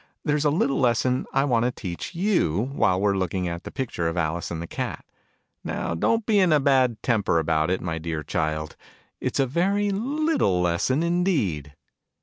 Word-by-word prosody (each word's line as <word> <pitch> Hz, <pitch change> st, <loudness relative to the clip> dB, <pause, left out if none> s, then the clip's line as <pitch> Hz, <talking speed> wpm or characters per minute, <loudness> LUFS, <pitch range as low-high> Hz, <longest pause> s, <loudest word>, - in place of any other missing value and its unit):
There's 150 Hz, 0 st, +1 dB
a -, -, +5 dB
little 140 Hz, -2 st, +1 dB
lesson 125 Hz, 0 st, +1 dB
I 135 Hz, -, +2 dB
want 120 Hz, -4 st, +2 dB
to -, -, +2 dB
teach 90 Hz, -, -6 dB
you, 140 Hz, -, +1 dB
while 90 Hz, -9 st, +2 dB
we're 100 Hz, 0 st, +2 dB
looking 95 Hz, -1 st, -1 dB
at 85 Hz, 0 st, -5 dB
this -, -, -6 dB
pic 130 Hz, -3 st, -4 dB
ture 85 Hz, -, -1 dB
of 85 Hz, +2 st, -3 dB
Alice 85 Hz, 0 st, -1 dB
and 85 Hz, -, -4 dB
the 85 Hz, -, -4 dB
Cat. -, -, -5 dB, 0.6 s
Now -, -, -3 dB
don't 225 Hz, -, +1 dB
be 210 Hz, -3 st, +3 dB
in 185 Hz, -3 st, +4 dB
a 150 Hz, -, +5 dB
bad 130 Hz, -4 st, +2 dB
temper 110 Hz, -8 st, +2 dB
about 80 Hz, 0 st, +1 dB
it, 95 Hz, -, 0 dB
my 80 Hz, -2 st, -3 dB
dear 80 Hz, -1 st, -4 dB
Child! 80 Hz, +1 st, -2 dB, 0.4 s
It's -, -, -2 dB
a 135 Hz, -, +4 dB
very 195 Hz, +9 st, +1 dB
little 275 Hz, -, +1 dB
lesson 90 Hz, -, +1 dB
indeed 140 Hz, -, 0 dB
115 Hz, 190 wpm, -24 LUFS, -, 0.6 s, a